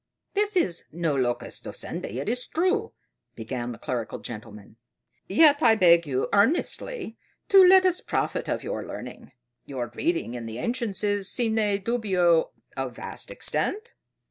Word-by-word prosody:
"This 415 Hz, 0 st, +1 dB
is 175 Hz, -, +1 dB
no 165 Hz, -2 st, -1 dB
locus 125 Hz, -2 st, -2 dB
docendi, 105 Hz, -, -6 dB
it 135 Hz, -, -4 dB
is 250 Hz, +3 st, -2 dB
true," 385 Hz, +7 st, 0 dB, 0.4 s
began 120 Hz, +1 st, -4 dB
the 115 Hz, -, -8 dB
clerical 120 Hz, -3 st, -4 dB
gentleman; 105 Hz, -2 st, -10 dB, 0.5 s
"yet 290 Hz, +8 st, +6 dB
I 230 Hz, -4 st, +6 dB
beg 170 Hz, -5 st, +5 dB
you 130 Hz, -1 st, 0 dB
earnestly 290 Hz, -, 0 dB, 0.3 s
to 390 Hz, -1 st, +8 dB
let 375 Hz, +1 st, +7 dB
us 365 Hz, -1 st, +2 dB
profit -, -, -2 dB
by -, -, -1 dB
your -, -, -4 dB
learning. -, -, -9 dB, 0.4 s
Your 125 Hz, -4 st, -4 dB
reading 165 Hz, -4 st, -1 dB
in 120 Hz, -2 st, -6 dB
the 110 Hz, 0 st, -6 dB
ancients 235 Hz, -, -3 dB
is, 205 Hz, -2 st, 0 dB
sine 220 Hz, -4 st, 0 dB
dubio, 185 Hz, -8 st, +2 dB, 0.3 s
of -, -, -4 dB
vast -, -, -6 dB
extent?" 435 Hz, +4 st, -3 dB
200 Hz, 145 wpm, -26 LUFS, -, 0.5 s, to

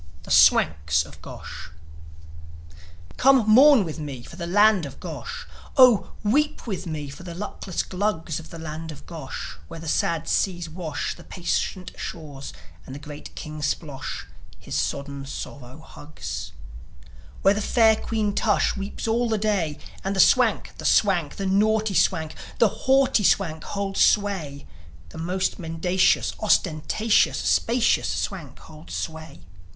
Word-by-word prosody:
THE -, -, -9 dB
SWANKS 75 Hz, +1 st, +4 dB
OF 75 Hz, -1 st, -15 dB
GOSH -, -, -9 dB, 1.5 s
Come 265 Hz, -4 st, +5 dB
mourn 255 Hz, 0 st, +7 dB
with 160 Hz, -1 st, -6 dB
me 140 Hz, -5 st, -6 dB
for -, -, -12 dB
the 170 Hz, -1 st, -5 dB
land 205 Hz, -2 st, +4 dB
of 135 Hz, -, -12 dB
Gosh, -, -, -7 dB, 0.3 s
Oh, 250 Hz, -6 st, +6 dB
weep 295 Hz, +8 st, +1 dB
with 190 Hz, -5 st, -4 dB
me 155 Hz, -3 st, -4 dB
for 140 Hz, -, -10 dB
the 175 Hz, -2 st, -8 dB
luckless 190 Hz, -1 st, -4 dB
Glugs 180 Hz, -5 st, -2 dB
Of 165 Hz, -, -12 dB
the 165 Hz, -, -9 dB
land 160 Hz, 0 st, -6 dB
of 145 Hz, -, -12 dB
Gosh, 155 Hz, -, -7 dB
where 165 Hz, -, -9 dB
the 165 Hz, -, -8 dB
sad 165 Hz, +1 st, 0 dB
seas 175 Hz, -3 st, 0 dB
wash 160 Hz, -2 st, -4 dB
The -, -, -14 dB
patient 180 Hz, 0 st, -3 dB
shores, 145 Hz, -5 st, -7 dB, 0.3 s
and 130 Hz, -, -9 dB
the -, -, -7 dB
great 145 Hz, 0 st, -10 dB
King 155 Hz, 0 st, -7 dB
Splosh 145 Hz, -1 st, -4 dB, 0.3 s
His -, -, -10 dB
sodden 140 Hz, -, -2 dB
sorrow 135 Hz, -1 st, -8 dB
hugs; 95 Hz, -, -8 dB, 0.9 s
Where 195 Hz, -, +6 dB
the 210 Hz, -, -2 dB
fair 220 Hz, 0 st, +4 dB
Queen 215 Hz, -2 st, -2 dB
Tush 210 Hz, 0 st, +1 dB
weeps 195 Hz, +3 st, -5 dB
all 235 Hz, +1 st, +1 dB
the 220 Hz, -, +1 dB
day, 200 Hz, -8 st, 0 dB, 0.3 s
And 195 Hz, +1 st, -2 dB
the -, -, -2 dB
Swank, -, -, +4 dB
the -, -, -7 dB
Swank, 180 Hz, -8 st, +2 dB
the 195 Hz, -, -4 dB
naughty 215 Hz, +2 st, +2 dB
Swank, 160 Hz, -3 st, +1 dB, 0.2 s
The 230 Hz, -, +5 dB, 0.2 s
haughty 265 Hz, -5 st, +4 dB
Swank 160 Hz, -5 st, +1 dB
holds 200 Hz, -1 st, -3 dB
sway 185 Hz, -9 st, +1 dB, 0.4 s
The 160 Hz, -, -10 dB
most 185 Hz, +4 st, -1 dB
mendacious, 180 Hz, +2 st, +1 dB
ostentatious, 205 Hz, +2 st, +2 dB
Spacious 235 Hz, 0 st, +2 dB
Swank 165 Hz, -10 st, -4 dB
holds 155 Hz, 0 st, -11 dB
sway. 160 Hz, -, -6 dB
175 Hz, 145 wpm, -24 LUFS, 150-205 Hz, 1.5 s, mourn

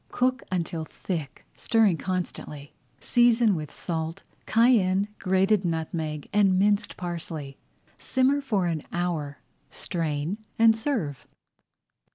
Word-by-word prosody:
Cook 255 Hz, +1 st, +1 dB
until 170 Hz, -3 st, -2 dB
thick, 155 Hz, -3 st, -6 dB
stirring 220 Hz, -7 st, +2 dB
constantly. 170 Hz, -6 st, -5 dB, 0.3 s
Season 240 Hz, -2 st, +4 dB
with 155 Hz, -4 st, -4 dB
salt, 165 Hz, +2 st, -4 dB, 0.2 s
cayenne, 210 Hz, -4 st, +3 dB
grated 190 Hz, +2 st, +2 dB
nutmeg, 160 Hz, -3 st, -3 dB
and 195 Hz, -3 st, +4 dB
minced 205 Hz, +1 st, +1 dB
parsley. 165 Hz, -5 st, -5 dB, 0.4 s
Simmer 270 Hz, +2 st, +2 dB
for 210 Hz, -9 st, 0 dB
an 165 Hz, -3 st, -1 dB
hour, 165 Hz, -5 st, -2 dB, 0.3 s
strain, 165 Hz, +2 st, -3 dB, 0.2 s
and 225 Hz, -1 st, +6 dB
serve. 220 Hz, -, -2 dB
185 Hz, 105 wpm, -26 LUFS, 160-215 Hz, 0.4 s, and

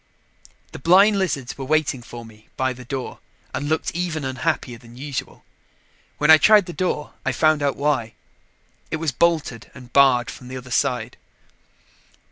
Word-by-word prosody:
The -, -, -9 dB
blind 195 Hz, +7 st, +5 dB
lizards 140 Hz, -10 st, -2 dB
were 135 Hz, -, -4 dB
waiting 150 Hz, -3 st, 0 dB
for 120 Hz, 0 st, -10 dB
me 110 Hz, -1 st, -18 dB
by 130 Hz, 0 st, 0 dB
the 125 Hz, 0 st, -11 dB
door 130 Hz, 0 st, -5 dB, 0.3 s
and 145 Hz, -, -3 dB
looked 160 Hz, -, 0 dB
even 165 Hz, -4 st, -3 dB
unhappier 130 Hz, -2 st, -2 dB
than 120 Hz, -1 st, -16 dB
usual. 140 Hz, 0 st, -6 dB, 0.7 s
When -, -, +4 dB
I 155 Hz, -, +9 dB
tried 210 Hz, +3 st, +6 dB
the 175 Hz, -, -7 dB
door, 180 Hz, -5 st, -2 dB
I -, -, 0 dB
found 155 Hz, -2 st, +2 dB
out 140 Hz, -1 st, 0 dB
why 140 Hz, -6 st, -1 dB, 0.7 s
it -, -, -2 dB
was 160 Hz, -2 st, -1 dB
bolted 150 Hz, -5 st, 0 dB
and 125 Hz, -1 st, -13 dB
barred 125 Hz, -5 st, +4 dB
from 125 Hz, -, -12 dB
the 130 Hz, +1 st, -6 dB
other 130 Hz, 0 st, -10 dB
side. -, -, -1 dB
140 Hz, 165 wpm, -22 LUFS, 125-155 Hz, 0.7 s, I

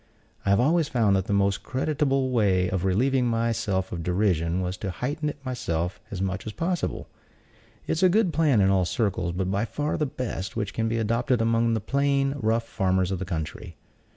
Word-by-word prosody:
I -, -, +3 dB
have 100 Hz, 0 st, +4 dB
always 155 Hz, +4 st, +3 dB
found 115 Hz, -8 st, +2 dB
that 95 Hz, -1 st, 0 dB
the 110 Hz, -, -4 dB
most 100 Hz, 0 st, +2 dB
creditable 135 Hz, -1 st, 0 dB
way 95 Hz, -6 st, +2 dB
of 95 Hz, -1 st, -1 dB
relieving 125 Hz, +7 st, +2 dB
myself 115 Hz, -5 st, 0 dB
of 85 Hz, -, -4 dB
derision 90 Hz, -1 st, +1 dB
was 90 Hz, 0 st, -2 dB
to 100 Hz, -, -4 dB
heighten 145 Hz, -, -2 dB
it 145 Hz, -, -6 dB
myself 90 Hz, -9 st, -2 dB
as 95 Hz, -2 st, -3 dB
much 95 Hz, +2 st, -3 dB
as 110 Hz, -, -5 dB
possible. 175 Hz, -, -2 dB, 0.8 s
It -, -, -3 dB
is 160 Hz, -, 0 dB
a 185 Hz, -, +6 dB
good 195 Hz, -2 st, +2 dB
plan 150 Hz, -9 st, +3 dB
in 95 Hz, 0 st, +4 dB
all 95 Hz, -1 st, +3 dB
circles, 95 Hz, -4 st, -1 dB
but 95 Hz, +2 st, -2 dB
by 100 Hz, +2 st, 0 dB
far 145 Hz, +7 st, -2 dB
the 150 Hz, -, 0 dB
best 110 Hz, -7 st, -5 dB
which 105 Hz, -3 st, -2 dB
can 115 Hz, 0 st, -1 dB
be 115 Hz, +1 st, -1 dB
adopted 115 Hz, +2 st, +1 dB
among 115 Hz, 0 st, +2 dB
the 110 Hz, -, -1 dB
plain, 140 Hz, +2 st, +1 dB
rough 115 Hz, 0 st, 0 dB
farmers 95 Hz, -1 st, 0 dB
of 95 Hz, -, -2 dB
the 95 Hz, -, -3 dB
country. 80 Hz, -4 st, -5 dB
110 Hz, 205 wpm, -26 LUFS, 95-130 Hz, 0.8 s, a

